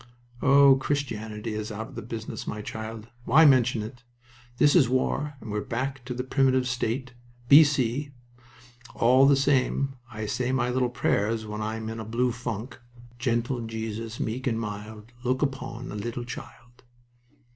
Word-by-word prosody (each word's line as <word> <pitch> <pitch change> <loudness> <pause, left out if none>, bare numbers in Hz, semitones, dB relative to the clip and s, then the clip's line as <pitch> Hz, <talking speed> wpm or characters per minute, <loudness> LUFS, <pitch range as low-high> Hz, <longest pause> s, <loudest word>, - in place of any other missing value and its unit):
"Oh, 140 0 +7
Christianity 110 -6 -3
is 110 +1 -4
out 110 +2 -7
of 115 -1 -7
business, 115 -1 -6
my 105 0 -4
child. 110 +1 -7 0.2
Why 155 +6 +6
mention 130 -5 +4
it? 120 +3 -9 0.6
This 145 +2 +5
is 140 -9 +5
war, 140 +3 0
and 110 - -8
we're 105 0 -1
back 130 +3 -3
to 125 -1 -4
the 125 - -2
primitive 130 -1 +2
state 125 +1 -2 0.4
B.C. 140 -2 +5 0.9
All 130 +3 +5
the 140 - +6
same, 135 0 +1
I 110 -2 -5
say 125 +4 -1
my 125 -1 +1
little 125 0 +1
prayers 110 -2 0
when 105 0 -5
I'm 110 +1 -3
in 115 0 -5
a - - -4
blue 120 +3 0
funk. 120 0 -5 0.4
"Gentle 120 0 0
Jesus, 110 0 -5
meek 125 +4 -3
and 115 -2 0
mild, 105 +1 -7
Look 130 +2 +1
upon 130 -3 -4
a - - -6
little 120 +3 -4
child." 120 0 -10
120 Hz, 155 wpm, -26 LUFS, 110-130 Hz, 0.9 s, Oh